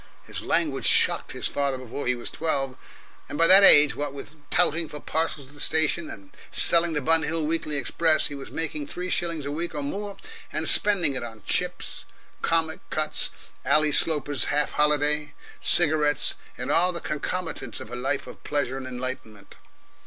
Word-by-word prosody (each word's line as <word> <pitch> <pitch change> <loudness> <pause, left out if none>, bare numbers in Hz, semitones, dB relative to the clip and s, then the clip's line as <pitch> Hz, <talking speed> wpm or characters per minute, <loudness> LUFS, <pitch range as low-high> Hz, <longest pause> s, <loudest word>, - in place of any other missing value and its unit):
His - - -7
language - - -1
shocked - - +3
his - - -3
father 140 -2 -2
before 130 +2 -7
he 125 - +1
was 120 - -7
twelve, 135 -5 -2 0.5
and - - -6
by 165 - +4
that 190 +3 +8
age, 145 -6 +8
what 145 -1 -4
with 140 +1 -9 0.2
touting 160 +1 +1
for 150 - -7
parcels 155 -2 -3
at 135 - -17
the 145 - -16
station 160 +2 +1
and 100 -1 -12 0.2
selling 170 -1 +3
the 150 - -2
Bun 165 +3 +3
Hill 160 0 -3
Weekly 155 -1 -2
Express, 155 +4 +1
he - - -4
was 140 -1 -9
making 155 -2 -4
three 180 +3 -6
shillings 165 -4 -2
a 140 - -4
week, 170 +2 -4
or 145 - -3
more, 200 +7 -5 0.3
and - - -2
spending 195 -8 +5
it 130 - -3
on 115 -3 -10
Chips, - - -2 0.4
Comic 165 -1 0
Cuts, 155 0 -2 0.3
Ally 150 0 +3
Sloper's 145 -4 +1
Half 150 0 -1
holiday, 150 0 +1 0.2
cigarettes, 150 -3 +4 0.2
and - - -4
all 180 +2 +3
the 170 - -5
concomitants 155 - -5
of 110 - -11
a - - -5
life 135 +3 -3
of - - -13
pleasure 140 -3 -2
and 130 -1 -7
enlightenment. 125 -5 -8
150 Hz, 180 wpm, -24 LUFS, 140-165 Hz, 0.5 s, that